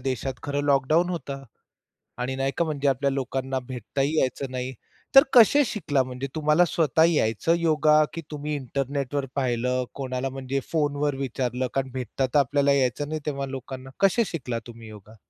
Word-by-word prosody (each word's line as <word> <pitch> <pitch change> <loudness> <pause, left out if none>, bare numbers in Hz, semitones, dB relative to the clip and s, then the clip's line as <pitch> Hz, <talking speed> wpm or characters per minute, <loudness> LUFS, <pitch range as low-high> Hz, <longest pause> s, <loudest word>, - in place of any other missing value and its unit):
देशात 130 0 -2
खरं 145 0 -2
लॉकडाउन 145 +5 +3
होतं 140 -5 -5 0.8
आणि 130 +2 -2
नाही 135 +1 0
का? 170 - +2
म्हणजे 145 -3 -1
आपल्या 140 +1 +1
लोकांना 135 0 -2
भेटताही 135 +5 -2
यायचं 130 +1 -1
नाही. 130 0 -4 0.4
तर 270 - +11
कसे 265 +4 +7
शिकला? 165 - 0
म्हणजे 130 +1 -5
तुम्हाला 155 +2 +3
स्वतः 160 -1 +2
यायचं 150 +1 +1
योगा, 155 -2 +4
की 165 - -5
तुम्ही 150 0 -4
इंटरनेटवर 140 +1 -2
पाहिलं? 125 -1 0
कोणाला 130 -1 -3
म्हणजे 135 +1 -3
फोनवर 145 -2 0
विचारलं? 130 -1 -2
कारण 135 -1 -1
भेटता 130 +1 -2
तर 130 +3 +1
आपल्याला 140 +1 +3
यायचं 135 +1 0
नाही 155 0 -3
तेव्हा 140 -2 -2
लोकांना. 130 0 -7
कसे 195 +4 +4
शिकला 125 -9 -4
तुम्ही 115 -1 -11
योगा? 110 +1 -13
135 Hz, 160 wpm, -25 LUFS, 130-150 Hz, 0.8 s, तर